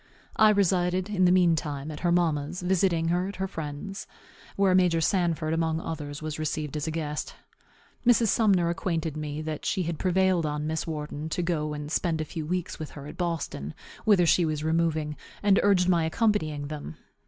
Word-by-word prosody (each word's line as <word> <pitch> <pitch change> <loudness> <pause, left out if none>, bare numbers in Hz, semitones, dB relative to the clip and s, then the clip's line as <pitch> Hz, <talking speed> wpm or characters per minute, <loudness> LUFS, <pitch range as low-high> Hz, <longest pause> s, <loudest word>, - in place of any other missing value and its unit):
I 215 0 +7
resided, 185 -1 +2
in 185 -3 +3
the 180 - +5
mean 180 -2 +5
time, 150 -2 -4
at 150 - -7
her 175 - +1
mamma's, 170 0 0
visiting 175 -2 +2
her 180 +2 +1
at 200 - -6
her 190 +1 -2
friend's, 165 +3 -6 0.5
where 195 -2 +3
Major 180 -3 +4
Sanford, 165 -2 +1
among 160 -1 0
others, 150 -2 -6
was 155 0 -4
received 155 -1 -3
as 150 +1 -2
a - - 0
guest. 155 -2 -4 0.7
Mrs. 235 -2 +4
Sumner 195 -7 +3
acquainted 165 -3 -2
me 155 0 -4
that 155 -1 -4
she 185 - 0
had 165 -2 -3
prevailed 185 -3 +2
on 150 0 -2
Miss 160 +1 -2
Wharton 150 -1 -4
to 175 +3 -1
go 155 -3 -1
and 150 0 -6
spend 165 -2 0
a 155 - -1
few 155 0 -6
weeks 180 0 -3
with 155 - -5
her 140 - -8
at 150 +3 -8
Boston, 160 - -3 0.3
whither 200 -5 +5
she 175 +2 +4
was 155 -2 -1
removing, 160 -2 0 0.3
and 200 -1 +5
urged 190 -3 +3
my 170 -3 +3
accompanying 160 -6 0
them. 145 - -7
165 Hz, 190 wpm, -27 LUFS, 155-185 Hz, 0.7 s, I